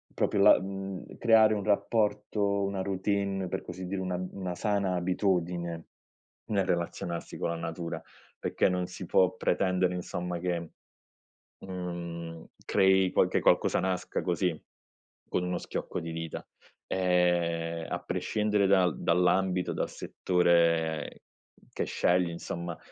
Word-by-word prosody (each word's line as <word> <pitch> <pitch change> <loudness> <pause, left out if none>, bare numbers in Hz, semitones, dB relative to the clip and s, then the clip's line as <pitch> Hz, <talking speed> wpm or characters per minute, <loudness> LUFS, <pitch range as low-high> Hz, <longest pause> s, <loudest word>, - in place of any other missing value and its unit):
proprio 100 - +1
la 105 - +8
mhmm, 95 0 -6
creare 110 -2 +6
un 105 -1 -2
rapporto, 105 -1 +1
una 100 -1 -2
routine, 95 0 -1
per - - -3
così 95 - -7
dire, 95 +1 -3
una 90 -1 -2 0.2
una 95 -2 -4
sana 100 -3 0
abitudine, 90 -2 -1 0.6
nel 100 -3 0
relazionarsi 85 -1 -3
con - - -1
la 85 - -2
natura, 85 +1 -5 0.3
perché - - +1
non 90 -1 -1
si 90 0 -8
può 95 +1 +4
pretendere, 90 -3 +1
insomma 90 0 -4
che, 85 -2 -2 0.9
mhmm, 85 -3 -6 0.2
crei 95 -1 +4
qualche - - +2
qualcosa - - +3
nasca 90 0 -2
così, 90 -2 0 0.7
con 90 - -1
uno 90 0 -1
schiocco - - -4
di 80 0 -5
dita, 80 -1 -5 0.4
ehm, 85 -2 +1
a - - -2
prescindere 105 -2 0
dal 95 -3 +3
dall'ambito, 90 +1 +2
dal - - -2
settore 85 -3 +1 0.5
che - - -2
scegli, 90 0 +2
insomma, 85 0 -5
90 Hz, 125 wpm, -29 LUFS, 85-95 Hz, 0.9 s, la